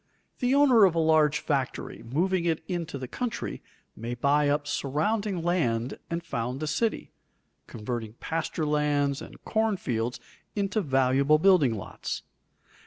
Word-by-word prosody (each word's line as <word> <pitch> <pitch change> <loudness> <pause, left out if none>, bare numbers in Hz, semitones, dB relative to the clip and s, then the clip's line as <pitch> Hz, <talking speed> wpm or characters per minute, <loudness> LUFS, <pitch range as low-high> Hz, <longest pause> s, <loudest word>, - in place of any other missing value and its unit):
The 255 +1 +2
owner 265 -6 +6
of 180 -3 +2
a - - +2
large 155 -2 +4
factory, 135 -5 -2
moving 170 +9 0
it 165 -1 0
into 170 -5 -3
the 130 -1 -6
country, 245 - -4 0.3
may 115 +2 -5
buy 145 +3 +2
up 145 0 +1
surrounding 175 +7 -1
land 130 -9 0
and 170 0 -3
found 125 -2 -3
a - - 0
city, 220 +9 -1 0.6
converting 110 -1 -5
pasture 160 +5 -3
lands 145 -2 +1
and - - -11
corn 220 -2 +1
fields 120 -5 -2 0.4
into 205 +1 0
valuable 135 0 +3
building 155 -9 +4
lots. 100 - -5
150 Hz, 140 wpm, -27 LUFS, 130-180 Hz, 0.6 s, owner